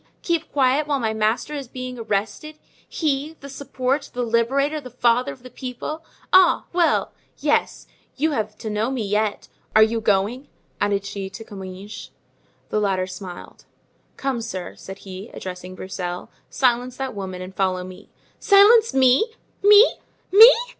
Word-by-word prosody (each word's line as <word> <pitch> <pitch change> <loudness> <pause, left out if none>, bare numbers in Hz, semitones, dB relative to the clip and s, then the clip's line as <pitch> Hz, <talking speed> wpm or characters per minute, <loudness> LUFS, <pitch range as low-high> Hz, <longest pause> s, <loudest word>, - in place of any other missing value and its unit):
keep 340 -2 -1
quiet 275 +2 +2
while 285 -2 0
my 220 -3 -1
master 220 +7 0
is 280 -3 -5
being 255 0 -7
arrested! 220 +8 -3 0.3
he, 300 0 -1
the 280 - -9
support, 275 0 -2
the 245 - -1
liberator, 270 +6 +1
the 255 - -10
father 240 0 +1
of 250 - -13
the 255 - -10
people! 260 +6 -6 0.3
Ah! 370 -2 +6
well, 345 -2 +2 0.3
yes; - - 0 0.3
you 310 +3 0
have 215 -5 -3
to - - -8
know 215 +3 0
me 255 -5 -2
yet. 210 +1 -1 0.3
Are 220 - +8
you 225 +1 0
going?" 215 +7 0 0.3
added 200 -1 0
she 195 -1 -5
to 225 - -9
Comminges. 195 0 -9 0.6
The 215 - 0
latter 190 -3 0
smiled. 185 -1 -10 0.5
"Come, 270 -3 -2
sir," 185 -5 -6
said 195 0 -10
he, 190 +3 -8
addressing 180 0 -7
Broussel, 180 -1 -6 0.2
"silence 250 -1 +1
that 265 -1 -4
woman 190 -2 -6
and 185 +1 -9
follow 185 -2 0
me." 185 +2 -12 0.3
"Silence 430 - +6
me! 260 +3 +5 0.4
me! 415 +3 +7 0.3
me!" 445 +5 +11
235 Hz, 155 wpm, -22 LUFS, 200-280 Hz, 0.6 s, me